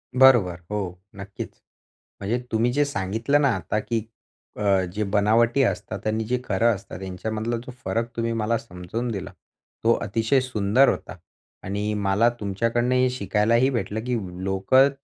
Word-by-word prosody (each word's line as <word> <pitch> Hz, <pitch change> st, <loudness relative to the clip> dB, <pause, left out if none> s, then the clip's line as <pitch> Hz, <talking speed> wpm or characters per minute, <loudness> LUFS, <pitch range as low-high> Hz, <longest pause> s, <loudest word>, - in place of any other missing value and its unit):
बरोबर. 120 Hz, -10 st, +5 dB
हो, 95 Hz, -4 st, -3 dB, 0.2 s
नक्कीच. 100 Hz, +1 st, -7 dB, 0.7 s
म्हणजे 110 Hz, +5 st, -1 dB
तुम्ही 115 Hz, +2 st, +2 dB
जे 145 Hz, +1 st, +3 dB
सांगितलं 115 Hz, +4 st, 0 dB
ना 140 Hz, -, +4 dB
आता, 95 Hz, +4 st, -2 dB
की 115 Hz, 0 st, -2 dB, 0.5 s
अ, 100 Hz, -2 st, +3 dB
जे 105 Hz, -, -1 dB
बनावटी 115 Hz, +5 st, +3 dB
असतात 100 Hz, -5 st, -2 dB
आणि 110 Hz, +1 st, 0 dB
जे 125 Hz, +3 st, 0 dB
खरं 110 Hz, +2 st, +2 dB
असतात, 95 Hz, -1 st, -9 dB
यांच्यामधला 110 Hz, +5 st, -3 dB
जो 130 Hz, -, -7 dB
फरक 115 Hz, +1 st, -1 dB
तुम्ही 115 Hz, 0 st, -1 dB
मला 115 Hz, +1 st, 0 dB
समजून 110 Hz, +2 st, -5 dB
दिला, 95 Hz, -2 st, -5 dB, 0.5 s
तो 115 Hz, +1 st, +5 dB
अतिशय 110 Hz, +6 st, +1 dB
सुंदर 125 Hz, +1 st, +3 dB
होता. -, -, -3 dB, 0.5 s
आणि, 105 Hz, +2 st, -2 dB
मला 105 Hz, +3 st, +3 dB
तुमच्याकडनं 115 Hz, +5 st, 0 dB
हे 130 Hz, 0 st, +3 dB
शिकायलाही 115 Hz, +3 st, +2 dB
भेटलं, 110 Hz, -4 st, -2 dB
की 125 Hz, -, 0 dB, 0.3 s
लोकं 95 Hz, +9 st, +4 dB
110 Hz, 150 wpm, -24 LUFS, 100-120 Hz, 0.7 s, बरोबर